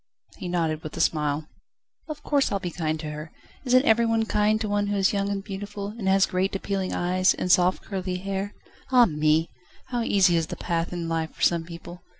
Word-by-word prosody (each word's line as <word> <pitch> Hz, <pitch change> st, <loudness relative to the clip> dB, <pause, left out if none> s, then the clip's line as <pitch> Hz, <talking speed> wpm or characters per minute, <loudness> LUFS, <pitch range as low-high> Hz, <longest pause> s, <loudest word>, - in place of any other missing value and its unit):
He 180 Hz, -, -6 dB
nodded 165 Hz, -3 st, -1 dB
with 155 Hz, -, -8 dB
a -, -, -4 dB
smile. 150 Hz, -1 st, 0 dB, 0.6 s
"Of 305 Hz, -, -6 dB
course 285 Hz, -2 st, +1 dB
I'll 200 Hz, -, 0 dB
be 180 Hz, -2 st, -4 dB
kind 155 Hz, -2 st, -2 dB
to 155 Hz, -2 st, -5 dB
her. 150 Hz, +1 st, -7 dB, 0.3 s
Isn't 255 Hz, +2 st, +4 dB
every 230 Hz, -2 st, +4 dB
one 225 Hz, -1 st, +1 dB
kind 215 Hz, 0 st, +2 dB
to 220 Hz, -, -2 dB
one 205 Hz, 0 st, 0 dB
who 205 Hz, -, -1 dB
is 195 Hz, +1 st, +2 dB
young 200 Hz, 0 st, 0 dB
and 200 Hz, -1 st, -3 dB
beautiful, 200 Hz, 0 st, -6 dB
and 210 Hz, -2 st, -5 dB
has 195 Hz, 0 st, +5 dB
great, 190 Hz, +2 st, -1 dB
appealing 195 Hz, -1 st, -2 dB
eyes, 185 Hz, +1 st, +2 dB
and 180 Hz, -, -1 dB
soft, 180 Hz, +1 st, +3 dB
curly 185 Hz, -2 st, -3 dB
hair? 195 Hz, +2 st, -4 dB, 0.4 s
Ah 250 Hz, -2 st, +7 dB
me! 155 Hz, -2 st, +1 dB, 0.4 s
how 245 Hz, -2 st, -1 dB
easy 195 Hz, -5 st, +3 dB
is 165 Hz, -1 st, 0 dB
the -, -, -5 dB
path 170 Hz, -1 st, -2 dB
in 175 Hz, -2 st, -4 dB
life 165 Hz, -1 st, -2 dB
for -, -, -5 dB
some 170 Hz, -1 st, +3 dB
people! 170 Hz, +1 st, -10 dB
190 Hz, 215 wpm, -25 LUFS, 165-205 Hz, 0.6 s, Ah